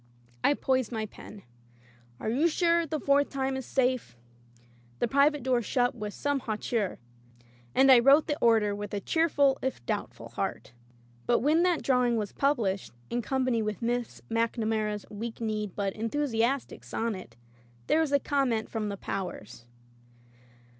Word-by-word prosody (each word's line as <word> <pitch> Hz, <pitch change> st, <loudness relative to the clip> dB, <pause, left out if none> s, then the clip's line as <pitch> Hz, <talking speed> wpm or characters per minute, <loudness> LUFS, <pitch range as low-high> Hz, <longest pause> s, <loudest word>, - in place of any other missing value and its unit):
'' 120 Hz, 0 st, -31 dB
I 290 Hz, -, +4 dB
poised 260 Hz, -4 st, 0 dB
my 220 Hz, -2 st, -2 dB
pen. 205 Hz, -1 st, -12 dB, 0.8 s
"You're 260 Hz, +9 st, +1 dB
sure 340 Hz, 0 st, +2 dB
the 310 Hz, +1 st, -2 dB
fourth 280 Hz, +1 st, +3 dB
time 270 Hz, -1 st, -2 dB
is 265 Hz, -2 st, -5 dB
safe?" 255 Hz, -, 0 dB, 0.8 s
The -, -, 0 dB
"Private" 280 Hz, +3 st, +3 dB
door 250 Hz, -2 st, +2 dB
shut 245 Hz, +3 st, +1 dB
with 210 Hz, -4 st, -6 dB
some 285 Hz, -1 st, 0 dB
hau 225 Hz, -4 st, -3 dB
teur. 215 Hz, -2 st, -2 dB, 0.8 s
And 270 Hz, +1 st, +6 dB
I 255 Hz, -, +9 dB
wrote 275 Hz, +5 st, +6 dB
the 295 Hz, -, -1 dB
order 220 Hz, -3 st, +4 dB
with 205 Hz, 0 st, -5 dB
a -, -, -1 dB
cheerful 285 Hz, 0 st, +2 dB
if 260 Hz, -, -3 dB
doubtful -, -, -4 dB
heart. -, -, -4 dB, 0.5 s
But 240 Hz, -, +3 dB
when 305 Hz, +6 st, +3 dB
that 355 Hz, -2 st, +2 dB
drawing 250 Hz, -3 st, +2 dB
was 210 Hz, -2 st, -2 dB
published, 225 Hz, -9 st, 0 dB, 0.2 s
in 240 Hz, -, 0 dB
company 255 Hz, -1 st, 0 dB
with 215 Hz, +1 st, -3 dB
Miss 240 Hz, 0 st, -2 dB
MacNamara's 220 Hz, -2 st, -1 dB
weak 220 Hz, +2 st, -6 dB
kneed 215 Hz, -4 st, -3 dB
but 200 Hz, -2 st, -1 dB
enthusiastic 240 Hz, +2 st, -1 dB
sonnet, 195 Hz, -, -4 dB, 0.5 s
there 310 Hz, -, +3 dB
was 320 Hz, -, 0 dB
conunent 260 Hz, -6 st, 0 dB
from 215 Hz, -2 st, -2 dB
the 200 Hz, -, -4 dB
Powers. 175 Hz, -, -6 dB
240 Hz, 155 wpm, -28 LUFS, 215-275 Hz, 0.8 s, I